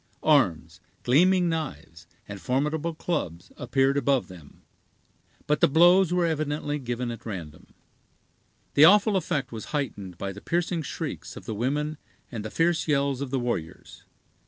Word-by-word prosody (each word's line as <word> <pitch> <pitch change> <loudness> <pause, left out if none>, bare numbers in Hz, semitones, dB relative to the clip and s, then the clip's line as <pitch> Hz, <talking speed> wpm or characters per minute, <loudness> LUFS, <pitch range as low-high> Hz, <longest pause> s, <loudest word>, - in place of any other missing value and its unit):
Arms, 85 - +2 0.2
gleaming 180 +8 +4
knives, 110 - -5 0.2
and 100 -2 -8
formidable 150 +5 -1
clubs, 85 - -4
appeared 135 +3 +1
above 140 -5 +1
them, 85 -6 -14 0.8
but 150 - 0
the - - +6
blows 175 +4 +5
were 180 -1 +2
evidently 150 -2 -2
given 120 -1 -3
at 115 0 -8
random. 85 -8 -8 1.0
The 150 - +7
awful 205 +3 +5
effect 160 -7 -1
was 110 -2 -7
heightened 105 - -4
by 100 +1 -4
the 100 +2 -10
piercing 170 0 -1
shrieks 150 - -6
of - - -10
the 110 - -4
women 145 +7 -2 0.3
and 115 -4 -5
the 110 - -5
fierce 165 +5 +1
yells 140 -2 +1
of 140 - -3
the 135 - -1
warriors. 120 -10 -5
140 Hz, 150 wpm, -26 LUFS, 110-160 Hz, 1.0 s, The